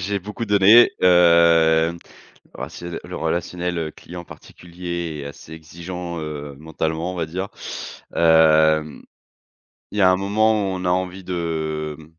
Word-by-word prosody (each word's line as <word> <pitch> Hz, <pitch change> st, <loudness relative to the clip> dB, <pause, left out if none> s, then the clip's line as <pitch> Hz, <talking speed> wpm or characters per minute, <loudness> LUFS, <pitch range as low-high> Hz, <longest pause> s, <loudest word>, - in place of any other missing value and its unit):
j'ai 100 Hz, +2 st, -2 dB
beaucoup 105 Hz, +4 st, -6 dB
donné. 105 Hz, +4 st, +6 dB
Heu, 85 Hz, -2 st, +4 dB, 0.6 s
oh -, -, -4 dB
c'est 85 Hz, -, -9 dB
le 85 Hz, -, -5 dB
le -, -, -8 dB
relationnel, 90 Hz, 0 st, -3 dB
heu, 80 Hz, -, -2 dB
le 80 Hz, -, -6 dB
client 85 Hz, +2 st, -11 dB
particulier 85 Hz, -4 st, -7 dB
est -, -, -9 dB
assez 70 Hz, +2 st, -10 dB
exigeant, 85 Hz, +2 st, -7 dB
heu, 75 Hz, -2 st, -7 dB
mentalement 80 Hz, +3 st, -3 dB
on -, -, -8 dB
va 85 Hz, -2 st, -2 dB
dire. 90 Hz, +5 st, -5 dB, 0.7 s
Hem, 80 Hz, -2 st, +3 dB, 0.9 s
il -, -, -6 dB
y -, -, +3 dB
a 95 Hz, -, +6 dB
un 95 Hz, -, +2 dB
moment 105 Hz, +3 st, +2 dB, 0.2 s
où -, -, -3 dB
on 90 Hz, 0 st, -5 dB
a -, -, +1 dB
envie 95 Hz, +1 st, -2 dB
de 80 Hz, -4 st, -3 dB
mmh 80 Hz, -, -13 dB
85 Hz, 160 wpm, -21 LUFS, 80-90 Hz, 0.9 s, donné